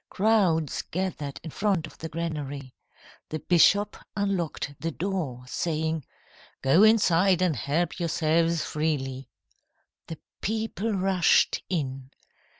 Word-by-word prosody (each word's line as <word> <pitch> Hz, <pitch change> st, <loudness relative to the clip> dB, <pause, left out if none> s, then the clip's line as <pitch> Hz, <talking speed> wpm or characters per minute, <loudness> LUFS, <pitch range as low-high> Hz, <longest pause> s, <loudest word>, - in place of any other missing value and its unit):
Crowds 185 Hz, -8 st, +2 dB
gathered 170 Hz, -6 st, -4 dB
in 160 Hz, -, -7 dB
front 195 Hz, -4 st, 0 dB
of -, -, -14 dB
the 160 Hz, -, -5 dB
granary. 145 Hz, -5 st, -5 dB, 0.6 s
The 155 Hz, -, -3 dB
bishop 200 Hz, +6 st, +4 dB, 0.2 s
unlocked 185 Hz, -8 st, -1 dB
the 165 Hz, +4 st, -2 dB
door, 165 Hz, -8 st, -3 dB
saying: 160 Hz, +1 st, -2 dB, 0.6 s
"'Go 135 Hz, +8 st, +5 dB
inside 195 Hz, -4 st, +5 dB
and 175 Hz, -5 st, +2 dB
help 150 Hz, -, -1 dB
yourselves 165 Hz, 0 st, +1 dB
freely.' 135 Hz, -4 st, -2 dB, 0.8 s
"The 165 Hz, -, -6 dB, 0.2 s
people 220 Hz, 0 st, -2 dB
rushed 190 Hz, -2 st, +3 dB
in. 135 Hz, -7 st, -3 dB
165 Hz, 110 wpm, -27 LUFS, 150-190 Hz, 0.8 s, Go